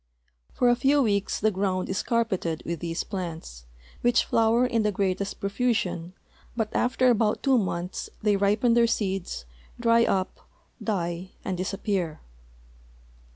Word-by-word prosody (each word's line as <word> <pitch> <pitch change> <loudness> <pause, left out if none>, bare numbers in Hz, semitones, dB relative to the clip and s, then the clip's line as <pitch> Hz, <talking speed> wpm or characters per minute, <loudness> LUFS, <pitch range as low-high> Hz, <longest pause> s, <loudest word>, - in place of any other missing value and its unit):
For 250 - +1
a 240 - +5
few 270 +4 +3
weeks 200 -3 0
the 215 +1 +2
ground 190 -1 -1
is 190 - -1
carpeted 190 -9 -1
with 170 -1 -3
these 165 -1 -3
plants, 165 - -6 0.3
which 240 0 +3
flower 230 +2 +3
in 235 -3 +1
the 210 -1 +1
greatest 195 0 -2
profusion, 200 -5 -1 0.4
but 220 -2 -2
after 255 0 +3
about 215 -2 +1
two 270 -3 +4
months 180 -2 -3
they 210 -1 +2
ripen 210 +4 +2
their 235 0 +5
seeds, 190 - -2 0.3
dry 230 0 +4
up, 190 -1 -1 0.4
die, 180 -3 -2
and 190 - -1
disappear. 185 -3 -2
200 Hz, 140 wpm, -26 LUFS, 185-230 Hz, 0.4 s, a